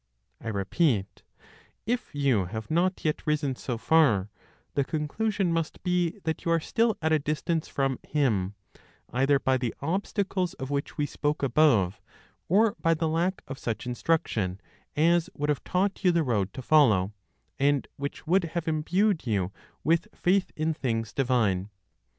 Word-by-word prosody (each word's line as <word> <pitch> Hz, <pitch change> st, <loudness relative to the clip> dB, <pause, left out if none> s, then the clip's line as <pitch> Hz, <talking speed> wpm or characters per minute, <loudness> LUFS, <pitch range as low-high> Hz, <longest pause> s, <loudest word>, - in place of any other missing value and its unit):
I -, -, -6 dB
repeat: 105 Hz, -, 0 dB, 0.6 s
if 240 Hz, -6 st, -2 dB
you 135 Hz, -9 st, +2 dB
have 110 Hz, -, -6 dB
not 180 Hz, +3 st, +1 dB
yet 155 Hz, -, 0 dB
risen 145 Hz, -3 st, +1 dB
so 125 Hz, -1 st, -4 dB
far, 115 Hz, -9 st, +3 dB, 0.4 s
the 140 Hz, -, +2 dB
conclusion 175 Hz, +6 st, -1 dB
must 165 Hz, -1 st, -2 dB
be 180 Hz, 0 st, +1 dB
that 160 Hz, -1 st, -2 dB
you -, -, -1 dB
are 165 Hz, -, +4 dB
still 225 Hz, +6 st, +1 dB
at 160 Hz, -, +2 dB
a 155 Hz, -, +4 dB
distance 155 Hz, +2 st, -1 dB
from 135 Hz, -2 st, -1 dB
Him, 105 Hz, -10 st, 0 dB, 0.6 s
either 135 Hz, +3 st, +3 dB
by 130 Hz, -1 st, +1 dB
the 125 Hz, -3 st, -3 dB
obstacles 190 Hz, +2 st, -1 dB
of 135 Hz, -3 st, -6 dB
which 140 Hz, 0 st, -3 dB
we 150 Hz, -, +1 dB
spoke 150 Hz, 0 st, -2 dB
above, 120 Hz, -, +3 dB, 0.5 s
or 210 Hz, +4 st, +4 dB
by 165 Hz, 0 st, +3 dB
the 160 Hz, +1 st, -1 dB
lack 170 Hz, +4 st, 0 dB
of 135 Hz, 0 st, -7 dB
such 115 Hz, 0 st, -3 dB
instruction 120 Hz, -, -1 dB, 0.4 s
as 170 Hz, +3 st, +3 dB
would 145 Hz, +1 st, -2 dB
have 145 Hz, -, 0 dB
taught 195 Hz, +2 st, 0 dB
you 180 Hz, -, +5 dB
the 170 Hz, -1 st, +2 dB
road 105 Hz, -8 st, 0 dB
to 130 Hz, -, -7 dB
follow, 110 Hz, -10 st, +4 dB, 0.5 s
and 140 Hz, 0 st, +2 dB
which 140 Hz, +2 st, -5 dB
would 180 Hz, +2 st, +3 dB
have 170 Hz, -1 st, -2 dB
imbued 165 Hz, -, +1 dB
you 100 Hz, -4 st, 0 dB, 0.3 s
with 165 Hz, +1 st, +2 dB
faith 185 Hz, +1 st, +1 dB
in 160 Hz, +1 st, 0 dB
things 115 Hz, -6 st, -2 dB
divine. 110 Hz, -8 st, +1 dB
150 Hz, 160 wpm, -27 LUFS, 125-170 Hz, 0.6 s, you